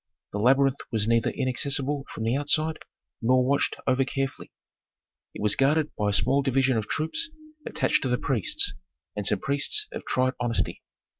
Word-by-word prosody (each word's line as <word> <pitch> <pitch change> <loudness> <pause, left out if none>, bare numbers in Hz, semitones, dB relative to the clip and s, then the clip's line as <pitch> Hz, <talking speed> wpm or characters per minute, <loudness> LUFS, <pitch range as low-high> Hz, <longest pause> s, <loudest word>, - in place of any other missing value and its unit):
The 105 - -2
labyrinth 135 +4 +3
was 110 -2 0
neither 115 -1 +2
inaccessible 135 +2 0
from 110 - -6
the 115 +3 +1
outside, 155 +2 0 0.4
nor 125 +2 +3
watched 140 +1 +1
over 130 +1 +2
carefully; 135 0 -4 0.8
it - - -6
was 105 -1 +3
guarded 150 +3 +2
by 105 -1 0
a - - -1
small 135 +6 +3
division 135 -1 +1
of 110 -2 -2
troops 320 - -1 0.4
attached - - +1
to 130 - -1
the 125 - +1
priests, 120 -9 +1 0.4
and 105 -1 -1
some 105 - +3
priests 140 - +1
of - - -7
tried 130 0 +1
honesty. 120 -1 -1
130 Hz, 165 wpm, -26 LUFS, 115-140 Hz, 0.8 s, labyrinth